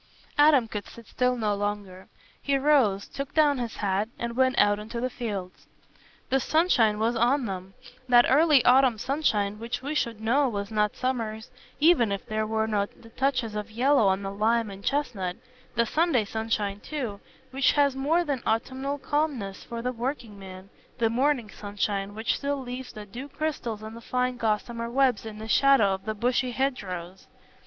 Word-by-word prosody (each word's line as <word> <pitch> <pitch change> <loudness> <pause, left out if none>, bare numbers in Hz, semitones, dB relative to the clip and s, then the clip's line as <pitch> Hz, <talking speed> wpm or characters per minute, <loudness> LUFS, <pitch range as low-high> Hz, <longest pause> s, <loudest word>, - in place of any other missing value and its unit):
Adam 290 -5 +5
could 210 -2 -6
sit 235 - -13
still 250 +3 0
no 215 -3 0
longer. 205 -2 -4 0.3
He 280 -1 +1
rose, 265 -9 +3
took 275 0 -7
down 295 -4 +4
his 235 -3 -4
hat, 200 +2 -1
and 235 0 -4
went 260 +1 +2
out 205 0 +4
into 225 +3 -6
the 255 +1 -2
fields. 205 -7 -6 0.6
The 270 - +4
sunshine 255 -9 +3
was 225 +2 +1
on 245 +3 +2
them: 190 -1 -6 0.3
that 240 -1 +7
early 295 -1 +5
autumn 255 -2 +5
sunshine 210 -6 0
which 230 +2 -4
we 285 +3 -3
should 235 -7 -1
know 255 +5 +2
was 200 -1 -4
not 210 -1 +1
summer's, 230 -4 -3 0.3
even 295 -9 +4
if 200 - -3
there 215 -1 -2
were 220 0 0
not 205 -2 -2
the 225 - -13
touches 255 -3 -1
of 210 +1 -4
yellow 245 0 +3
on 190 +1 +1
the 195 - -3
lime 220 +2 +1
and 195 0 -10
chestnut; 225 -11 -1 0.4
the 235 - +3
Sunday 305 -4 +2
sunshine 210 -2 -2
too, 240 -7 -5 0.3
which 270 0 +3
has 285 -2 +3
more 305 +6 +2
than 285 -6 -2
autumnal 265 +5 -1
calmness 275 -8 -2
for 235 -1 -6
the 250 - 0
working 235 -4 -4
man; 190 0 -11 0.3
the 225 -1 +1
morning 250 -3 +1
sunshine, 205 -1 -3
which 220 +2 -1
still 285 0 -2
leaves 255 0 -6
the 210 -3 -9
dew 245 +8 -8
crystals 260 -8 -3
on 220 +1 -7
the 230 - -10
fine 250 +1 -1
gossamer 230 +1 -1
webs 250 -3 +2
in 215 -1 -8
the 220 +1 -7
shadow 225 -5 +4
of 190 0 -6
the 215 0 -2
bushy 250 +3 +1
hedgerows. 195 -9 -3
230 Hz, 180 wpm, -27 LUFS, 210-265 Hz, 0.6 s, that